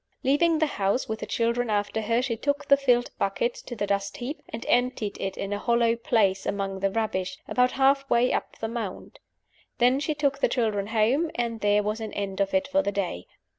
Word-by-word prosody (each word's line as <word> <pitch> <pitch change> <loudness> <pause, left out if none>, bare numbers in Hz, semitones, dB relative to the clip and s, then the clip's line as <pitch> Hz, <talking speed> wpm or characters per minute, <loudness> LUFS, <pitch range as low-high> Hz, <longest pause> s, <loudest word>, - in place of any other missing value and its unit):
Leaving 315 +5 +3
the 315 - +3
house, 200 -3 -1
with 220 0 -3
the 210 - -6
children 235 +2 0
after 205 +1 0
her, 230 +3 +1
she 240 -3 -1
took 285 +5 -1
the 280 - +7
filled 250 -3 +2
bucket 200 +5 0
to 240 - -9
the 205 -2 -1
dust 200 0 -2
heap, 255 +5 -5
and 225 - -6
emptied 245 -4 +1
it 195 - -3
in 200 +1 -3
a 205 - -2
hollow 235 0 +2
place 200 -4 +1
among 195 -1 -2
the 195 +1 +1
rubbish, 195 -3 -2
about 250 0 +2
half 275 +1 +3
way 240 +1 +3
up - - -3
the 225 - -3
mound. 225 -4 -6 0.6
Then 250 +2 +4
she 300 +1 -1
took 280 -2 0
the - - +2
children 215 -5 0
home; 235 +9 +2
and 235 -2 -2
there 205 0 +3
was 210 +2 -2
an 220 - -5
end 200 -1 -4
of 195 - +1
it 285 0 +2
for 285 +1 +2
the 200 - -1
day. 185 - -3
230 Hz, 215 wpm, -26 LUFS, 205-260 Hz, 0.6 s, the